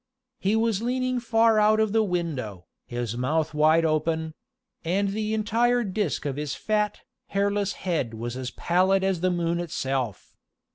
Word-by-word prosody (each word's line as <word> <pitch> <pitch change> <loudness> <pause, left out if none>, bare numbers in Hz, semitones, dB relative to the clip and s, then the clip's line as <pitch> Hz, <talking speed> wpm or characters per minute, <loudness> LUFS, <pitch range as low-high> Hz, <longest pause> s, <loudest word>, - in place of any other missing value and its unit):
He 200 +3 +1
was 225 -2 +1
leaning 255 +1 0
far 225 -2 +3
out 215 +1 +4
of 220 -1 +2
the 225 +1 +3
window, 155 - -3 0.2
his 120 -2 -3
mouth 150 +6 0
wide 155 +2 +4
open; 160 0 0 0.5
and 195 +4 +1
the 215 +2 -1
entire 235 +3 +2
disk 200 -6 -2
of 140 -1 -2
his 150 -1 -3
fat, 210 -1 -1 0.3
hairless 200 0 0
head 155 -11 -2
was 120 +2 -5
as 130 -1 -4
pallid 185 +6 +2
as 190 -2 +1
the 185 +2 +1
moon 170 -1 0
itself. 135 - -3
185 Hz, 155 wpm, -26 LUFS, 150-215 Hz, 0.5 s, out